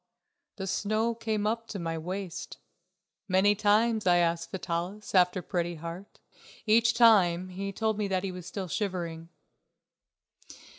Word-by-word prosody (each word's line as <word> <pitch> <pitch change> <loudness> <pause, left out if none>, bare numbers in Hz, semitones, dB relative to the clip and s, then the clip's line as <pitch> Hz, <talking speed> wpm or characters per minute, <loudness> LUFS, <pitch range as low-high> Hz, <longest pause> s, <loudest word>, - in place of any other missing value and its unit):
The 190 - -5
snow 215 +4 0
came 220 -2 -2
up 230 +1 -1
to 210 - -6
my 165 -2 -3
waist. 180 +2 -5 0.7
Many 190 +2 +4
times 215 +1 +2
I 175 0 +5
asked 170 -1 0
Vitalis 185 +2 -4
after 180 -1 +3
Pretty 175 0 -2
Heart. 170 +5 -9 0.5
Each 225 +1 +4
time 185 -6 +5
he 195 +2 -5
told 220 +1 -1
me 210 - 0
that 190 -1 -1
he 195 - -2
was 180 -1 -9
still 190 0 -5
shivering. 170 -3 -3
190 Hz, 140 wpm, -29 LUFS, 175-215 Hz, 0.7 s, I